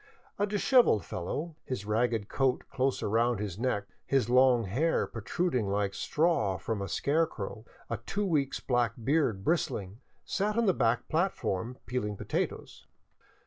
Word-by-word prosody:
A 205 - +2
dishevelled 210 - +4
fellow, 150 - -4
his 125 -6 -4
ragged 110 -1 0
coat 130 0 +1
close 135 0 0
up - - 0
around 115 +1 +2
his 100 -2 -4
neck, 115 -5 0 0.2
his 130 -4 +1
long 125 -2 +5
hair 130 - +1
protruding 120 - -1
like 100 0 0
straw 150 - +1
from 105 +3 -3
a 100 - -4
scarecrow, 125 - -1 0.2
a - - -2
two 205 +1 -3
weeks' 150 -7 0
black 120 -3 +1
beard 130 -7 +1
bristling, 105 - -1 0.3
sat 210 +2 -1
on 235 - +3
the 190 - +4
back 120 -3 +1
plat 175 +4 +1
form, 115 +7 -3
peeling 105 -5 -2
potatoes. - - -4
125 Hz, 150 wpm, -30 LUFS, 105-155 Hz, 0.3 s, long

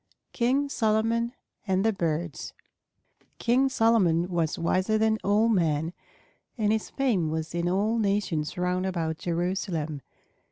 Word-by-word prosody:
KING 265 +4 +1
SOLOMON 230 -1 +1 0.3
AND 190 +1 +1
THE 225 - +3
BIRDS 165 -3 -3 0.8
King 255 +3 +2
Solomon 190 -9 +3
was 170 -4 -1
wiser 185 +5 +1
than 220 0 +2
all 210 +3 +3
men, 165 -6 +1 0.6
and 210 -2 +1
his 220 -1 -1
fame 225 - 0
was 160 +1 -3
in 170 0 0
all 210 +5 +1
nations 195 -8 -1
round 180 +1 0
about 165 -4 -2
Jerusalem. 170 -4 -2
190 Hz, 125 wpm, -27 LUFS, 170-220 Hz, 0.8 s, THE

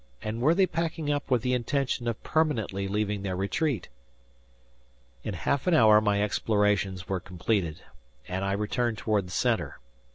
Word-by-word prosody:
And 110 +2 -3
were 155 +6 +4
they 190 0 +5
packing 165 -3 -2
up 145 -1 -2
with 125 -4 +2
the 125 - +1
intention 125 0 -1
of 115 -2 -3
permanently 115 -11 0
leaving 105 0 -1
their 95 -2 -3
retreat? 100 - -1 1.4
In 105 - -4
half 130 - -1
an 175 - +4
hour 110 -6 +7
my 105 -1 +2
explorations 105 -3 0
were 95 -1 -1
completed 90 -2 -2 0.4
and 95 +1 -3
I 100 0 0
returned 110 +3 -1
toward 105 -3 0
the - - -10
center. - - 0
105 Hz, 160 wpm, -28 LUFS, 100-130 Hz, 1.4 s, hour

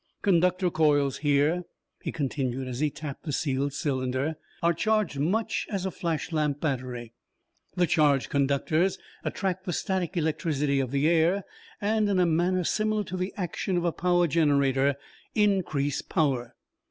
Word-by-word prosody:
"Conductor 180 -1 +3
coils 145 -4 +2
here," 145 +4 +2 0.4
he - - -3
continued 135 -3 -2
as 125 -1 -5
he 150 0 +2
tapped 145 -1 -7
the 155 - -4
sealed 140 -1 0
cylinder, 130 +1 -1 0.3
"are 170 0 +4
charged 215 -5 0
much 200 +10 0
as 195 -3 -2
a 190 - -1
flash 165 -1 -3
lamp 150 -3 0
battery. 125 -6 -3 0.6
The 180 - +3
charged 145 -5 +3
conductors 145 +6 +1 0.3
attract 190 -1 -2
the 180 - -2
static 180 0 -2
electricity 150 -3 0
of 130 -2 -1
the 140 +3 +1
air, 170 +4 +3 0.4
and, 210 0 +1
in 195 - +2
a 180 - +4
manner 175 +3 +2
similar 215 +3 0
to 185 -1 -6
the 185 +1 -2
action 180 0 -2
of 175 - 0
the 170 - +2
power 175 +1 +2
generator, 140 -3 +2 0.4
increase 185 -10 +1
power. 130 -7 -1
160 Hz, 155 wpm, -27 LUFS, 140-180 Hz, 0.6 s, are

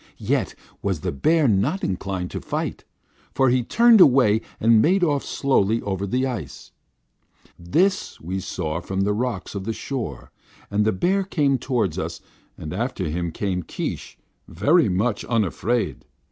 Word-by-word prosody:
"Yet - - -1 0.3
was 95 -6 -2
the - - -2
bear 155 - +2
not 105 - +1
inclined 95 -1 -3
to - - -5
fight, - - -4 0.5
for 135 -1 +4
he 125 +1 +3
turned 230 - +5
away 125 -7 +5 0.2
and 115 -1 +5
made 180 - +3
off 145 -4 +1
slowly 115 -5 +1
over 100 0 -2
the 130 +6 0
ice. 105 - -6 0.9
This 175 - 0
we 90 +4 -4
saw 80 -3 -3
from 95 +2 -3
the 105 +1 +1
rocks 115 -3 -3
of 100 -2 -4
the 115 +3 -2
shore, 115 - -5 0.4
and 105 +1 +2
the 110 - +3
bear 190 - +1
came 145 -8 +1
toward 115 - -1
us, - - -4 0.4
and 75 - -6
after 105 - -2
him 85 +1 -2
came 95 +1 -2
Keesh, - - -5 0.3
very 120 - +3
much 100 +4 0
unafraid. 115 +1 -1
110 Hz, 155 wpm, -23 LUFS, 95-135 Hz, 0.9 s, turned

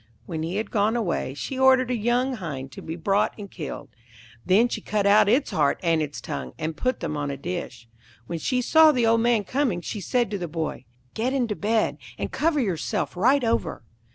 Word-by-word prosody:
When 160 -3 -4
he 165 +3 -3
had 215 +2 -3
gone 215 +1 +2
away, 175 - -1
she 260 - -5
ordered 260 -1 +5
a - - +1
young 240 +4 +1
hind 140 -8 -6
to - - -9
be 160 - -5
brought 195 +4 +1
and 200 -3 -9
killed; 155 -5 -7 0.5
then 205 +6 +4
she - - -4
cut 210 -2 -1
out 200 0 +5
its 260 +6 +2
heart 145 -3 +1
and 165 -2 +2
its 145 -2 -4
tongue, 65 -1 -6
and 155 0 -3
put 255 +8 -1
them 150 - -3
on 145 -1 -2
a 140 - -4
dish. 140 -7 -6 0.4
When 165 +6 -4
she 250 - 0
saw 315 +4 +6
the 245 -5 +1
old 225 0 +4
man 235 -2 +2
coming 255 -4 0
she 205 +3 -5
said 240 0 0
to 200 - -2
the 175 - -3
boy, 160 -5 -4 0.3
'Get 245 +4 -1
into 240 -6 0
bed, 215 +2 0 0.2
and - - -4
cover 315 -1 +1
yourself 185 - -1
right 255 +9 +3
over.' 225 - -1
205 Hz, 210 wpm, -25 LUFS, 165-245 Hz, 0.5 s, saw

